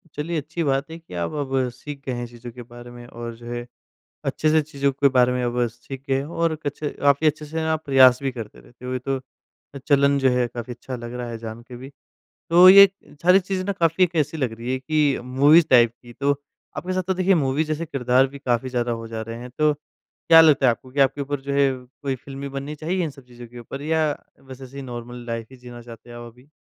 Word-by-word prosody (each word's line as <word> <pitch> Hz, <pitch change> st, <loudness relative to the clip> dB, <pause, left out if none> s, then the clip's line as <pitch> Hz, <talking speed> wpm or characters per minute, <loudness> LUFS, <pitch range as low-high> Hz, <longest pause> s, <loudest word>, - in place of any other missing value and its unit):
चलिए, 160 Hz, +3 st, -3 dB
अच्छी 160 Hz, +4 st, -4 dB
बात 140 Hz, +1 st, 0 dB
है 165 Hz, -, -7 dB
कि 165 Hz, -, -16 dB
आप 85 Hz, -1 st, -3 dB
अब 135 Hz, -2 st, -1 dB
सीख 140 Hz, +3 st, -9 dB
गए 130 Hz, -, -2 dB
हैं, 120 Hz, 0 st, -4 dB
चीज़ों 120 Hz, 0 st, -11 dB
के 125 Hz, +1 st, -10 dB
बारे 120 Hz, +1 st, -12 dB
में 120 Hz, 0 st, -11 dB
और 115 Hz, -1 st, -7 dB
जो 120 Hz, +1 st, -14 dB
है, 120 Hz, 0 st, -5 dB, 0.6 s
अच्छे 155 Hz, -, 0 dB
से 160 Hz, 0 st, +4 dB
चीज़ों 140 Hz, -2 st, -1 dB
के 140 Hz, +1 st, +2 dB
बारे 125 Hz, 0 st, +5 dB
में 125 Hz, 0 st, -1 dB
अब 120 Hz, 0 st, 0 dB
सीख 120 Hz, +3 st, -10 dB
गए 135 Hz, -, +1 dB
हैं 135 Hz, -, -3 dB
और 165 Hz, 0 st, -1 dB
कुछ 145 Hz, -2 st, -6 dB
काफ़ी 145 Hz, +1 st, +2 dB
अच्छे 155 Hz, 0 st, -1 dB
से 160 Hz, +2 st, -4 dB
आप 160 Hz, 0 st, -3 dB
प्रयास 130 Hz, -3 st, +6 dB
भी 135 Hz, -, 0 dB
करते 115 Hz, -4 st, -9 dB
थे। -, -, -20 dB
तो 125 Hz, +1 st, -8 dB
ये 130 Hz, -, -2 dB
तो 135 Hz, +1 st, -2 dB, 0.7 s
चलन 140 Hz, -1 st, +4 dB
जो 135 Hz, -1 st, +3 dB
है 125 Hz, -1 st, +1 dB
काफ़ी 120 Hz, +1 st, -7 dB
अच्छा 130 Hz, +2 st, -7 dB
लग 120 Hz, 0 st, -8 dB
रहा 125 Hz, -1 st, -5 dB
है 115 Hz, -, -5 dB
जान 115 Hz, 0 st, -8 dB
के 125 Hz, +1 st, -11 dB
भी। 130 Hz, +2 st, -10 dB, 0.6 s
तो 175 Hz, +2 st, +8 dB
ये 200 Hz, +1 st, +10 dB, 0.4 s
सारी 180 Hz, +3 st, +6 dB
चीज़ें 185 Hz, 0 st, -3 dB
ना 200 Hz, -, -1 dB
काफ़ी 170 Hz, 0 st, +2 dB
एक 175 Hz, -1 st, -4 dB
ऐसी 155 Hz, +3 st, -9 dB
लग 130 Hz, -7 st, -1 dB
रही 115 Hz, +3 st, -5 dB
है 130 Hz, -, -1 dB
कि 145 Hz, +1 st, +1 dB
मूवीज़ 145 Hz, +6 st, +5 dB
टाइप 120 Hz, -2 st, +6 dB
की 120 Hz, -1 st, -13 dB
तो 140 Hz, +4 st, +1 dB, 0.4 s
आपके 185 Hz, -, -3 dB
साथ 185 Hz, 0 st, 0 dB
तो 190 Hz, -, +2 dB
देखिए 185 Hz, +1 st, +3 dB
मूवी 135 Hz, +4 st, +1 dB
जैसे 155 Hz, +2 st, -3 dB
किरदार 130 Hz, -3 st, +2 dB
भी 140 Hz, +1 st, -11 dB
काफ़ी 130 Hz, -2 st, -1 dB
ज़्यादा 120 Hz, -1 st, -1 dB
हो 115 Hz, -, -8 dB
जा 110 Hz, -1 st, -5 dB
रहे 115 Hz, +1 st, -7 dB
हैं, 125 Hz, +1 st, -9 dB
तो 150 Hz, +4 st, +2 dB
क्या 165 Hz, +2 st, +2 dB
लगता 150 Hz, -4 st, +5 dB
है -, -, +6 dB
आपको 130 Hz, +2 st, -6 dB
कि 140 Hz, -, -1 dB
आपके 135 Hz, +1 st, +3 dB
ऊपर 140 Hz, 0 st, -3 dB
जो 140 Hz, +1 st, -5 dB
है, 140 Hz, -1 st, +3 dB, 0.3 s
कोई 140 Hz, -2 st, -1 dB
फ़िल्म 135 Hz, +2 st, -10 dB
भी 140 Hz, -, -4 dB
बननी 140 Hz, +2 st, -6 dB
चाहिए 170 Hz, +5 st, -2 dB
इन 160 Hz, -, -3 dB
सब 135 Hz, -1 st, -16 dB
चीज़ों 120 Hz, -1 st, -12 dB
के 120 Hz, +1 st, -13 dB
ऊपर 135 Hz, +4 st, -8 dB
या 155 Hz, 0 st, +1 dB, 0.3 s
बस 130 Hz, -1 st, -12 dB
ऐसे 135 Hz, +2 st, -8 dB
नॉर्मल 120 Hz, -1 st, -8 dB
लाइफ 115 Hz, -1 st, -4 dB
ही 130 Hz, -, -13 dB
जीना 120 Hz, -1 st, -11 dB
चाहते 115 Hz, 0 st, -13 dB
हैं 120 Hz, -, -9 dB
आप 120 Hz, -1 st, -10 dB
अभी? 125 Hz, +4 st, -22 dB
135 Hz, 250 wpm, -23 LUFS, 120-150 Hz, 0.7 s, ये